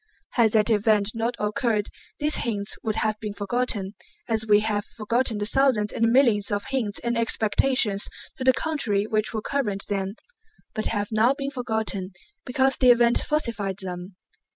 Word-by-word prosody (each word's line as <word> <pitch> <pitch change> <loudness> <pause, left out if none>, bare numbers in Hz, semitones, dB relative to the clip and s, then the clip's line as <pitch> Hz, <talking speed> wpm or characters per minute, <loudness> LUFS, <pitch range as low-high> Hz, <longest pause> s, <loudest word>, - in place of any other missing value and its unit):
Had 225 -3 +3
that 220 +1 +3
event 210 -1 +3
not 230 +1 -1
occurred 215 -1 0 0.3
these 300 +1 -1
hints 205 -3 -2
would 215 -2 -2
have 215 -1 0
been 210 -2 -5
forgotten, 205 -2 -2 0.3
as 220 -1 -1
we 210 0 +5
have 210 -1 -1
forgotten 230 +1 0
the 205 - -2
thousands 230 -3 +2
and 230 - +2
millions 235 -6 +3
of 205 0 -1
hints 235 -7 -1
and 235 0 0
expectations 225 -1 +1 0.3
to - - -4
the 260 - +6
contrary 240 -10 -1
which 215 -1 -1
were 220 -2 -4
current 210 -9 -1
then 195 0 -2 0.6
but 215 - -1
have 205 -2 -1
now 225 +5 +3
been 275 -1 -4
forgotten 220 -7 -2 0.3
because 265 +1 +2
the 255 - +4
event 240 0 +5
falsified 225 - -1
them. 180 -1 -6
220 Hz, 165 wpm, -25 LUFS, 205-245 Hz, 0.6 s, the